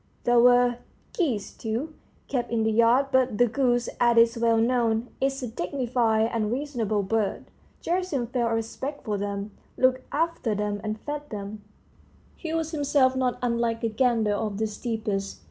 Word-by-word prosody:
There 240 0 +4
were 245 0 +5 0.4
geese, 230 - -1
too, 240 +8 -4 0.3
kept 245 -3 -2
in 230 -1 +1
the 220 - +2
yard; 235 +5 +4
but 255 -4 +2
the 245 - +5
goose, 245 0 +1
as 240 -1 +4
is 230 +1 +5
well 230 -1 +2
known, 230 0 +1
is 270 0 0
a - - -2
dignified 230 0 0
and 215 -2 0
reasonable 240 -6 -1
bird: 210 +1 -2 0.3
Gerasim 345 -8 -1
felt 235 -3 +1
a - - +2
respect 265 +6 -5
for 210 -3 -1
them, 200 +1 -4 0.3
looked 255 0 +3
after 320 -8 0
them, 205 0 -2
and 215 0 -3
fed 295 0 -5
them; 205 0 -6 0.7
he 325 - -6
was 325 -1 -1
himself 285 -4 +2
not 255 -1 0
unlike 235 -1 0
a 230 - +1
gander 225 -2 +2
of 205 -1 -2
the 220 - 0
steppes. 215 -3 -3
235 Hz, 165 wpm, -26 LUFS, 220-260 Hz, 0.7 s, were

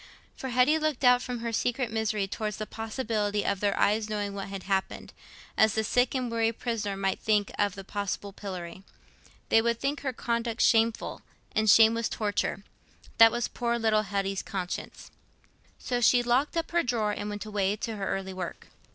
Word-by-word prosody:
For 265 - -5
Hetty 255 +6 +3
looked 310 -4 -1
out 250 0 +6
from 245 -2 -5
her 230 0 -3
secret 245 +1 0
misery 215 -3 -1
towards 210 0 -4
the 215 - -4
possibility 215 -2 -2
of 200 -1 0
their 200 0 0
ever 215 +2 +3
knowing 205 -1 -2
what 195 -1 -5
had 195 -1 -6
happened, 195 -1 -2 0.4
as 220 -1 +4
the 220 - +1
sick 245 +4 +1
and 250 -2 -1
weary 225 0 +1
prisoner 220 -4 -3
might 195 -1 -1
think 210 -2 +1
of 205 -1 +1
the 195 - -8
possible 200 0 -4
pillory. 185 -3 -7 0.7
They 225 - +5
would 235 0 0
think 280 +1 -1
her 275 -2 -1
conduct 235 -1 -2
shameful, 225 0 +2 0.3
and 215 0 +2
shame 225 +2 +7
was 230 0 -1
torture. 205 -2 -2 0.6
That 225 0 +9
was 240 +1 -1
poor 235 -1 -1
little 220 -2 +2
Hetty's 195 -1 -2
conscience. 185 -2 -6 0.7
So 245 -1 -2
she 245 0 +5
locked 255 +7 +1
up 330 - -2
her 340 0 +3
drawer 235 -6 0
and 205 0 -4
went 205 0 -5
away 205 -1 0
to 220 +1 -4
her 195 - -3
early 190 -1 -3
work. 185 -2 -6
220 Hz, 185 wpm, -28 LUFS, 200-240 Hz, 0.7 s, That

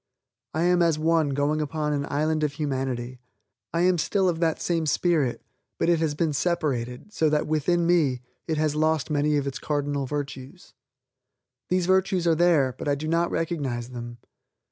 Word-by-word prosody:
I 160 - +1
am 175 0 +3
as 165 -3 +3
one 160 -1 +2
going 145 +2 0
upon 150 0 -2
an 145 0 -2
island 155 +2 0
of 150 -2 0
humanity. 130 -4 -3 0.5
I 170 - 0
am 180 -1 +3
still 190 +4 +1
of 170 -2 0
that 165 -2 +1
same 165 -2 -1
spirit; 155 -6 +1 0.3
but - - +1
it 170 -2 +3
has 155 -2 0
been 155 0 0
separated, 140 - -2
so 155 - +2
that 150 0 +1
within 165 +3 +1
me, 150 -8 +2 0.2
it 160 -2 -1
has 155 -1 +1
lost 155 0 +1
many 150 0 +2
of 140 - -1
its 135 -2 -4
cardinal 145 -2 -2
virtues. 145 +3 -6 1.0
These 185 -1 +1
virtues 185 -1 +2
are 165 - +4
there, 160 -6 +3
but - - -6
I 145 - +2
do 155 +2 -5
not 170 +1 +1
recognize 135 -8 -2
them. 120 -1 -7
155 Hz, 180 wpm, -25 LUFS, 140-170 Hz, 1.0 s, are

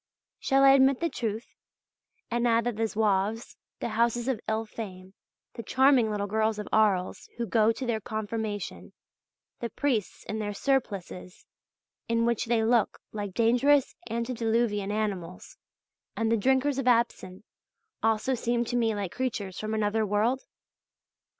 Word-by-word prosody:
Shall 270 0 +3
I 270 - +8
admit 270 -1 +5
the 335 -2 -1
truth, 225 -2 -3 0.9
and 240 +1 +1
add 230 0 +3
that 240 -1 -2
the 225 +1 0
Zouaves, 215 +1 0 0.3
the - - -2
houses 235 +2 +1
of 260 -5 0
ill 220 +1 -1
fame, 190 -4 -8 0.4
the - - -6
charming 260 0 +4
little 205 -1 -2
girls 220 +1 0
of 210 - -5
Arles 200 -4 +1
who 235 - -1
go 220 +1 +3
to 255 +3 -5
their 230 -3 -1
confirmation, 215 -1 -4 0.7
the 235 - -3
priests 240 -6 -2
in 220 - -4
their 205 -1 -3
surplices, 200 -9 -2 0.6
in 230 0 +2
which 235 -1 0
they 230 -1 +1
look 230 -1 +2
like 205 -3 -5
dangerous 250 +5 +3 0.2
antediluvian 230 -3 0
animals,{FF} 195 -5 -4 0.6
and 225 0 0
the - - +4
drinkers 265 +5 +2
of 260 - -2
absinthe 230 -5 +1 0.6
also 225 +3 +1
seem 240 0 0
to 245 - -3
me 225 -3 +1
like 200 -4 -3
creatures 210 -7 -3
from 215 0 -3
another 215 +1 +1
world? 215 +6 +1
225 Hz, 150 wpm, -28 LUFS, 210-240 Hz, 0.9 s, I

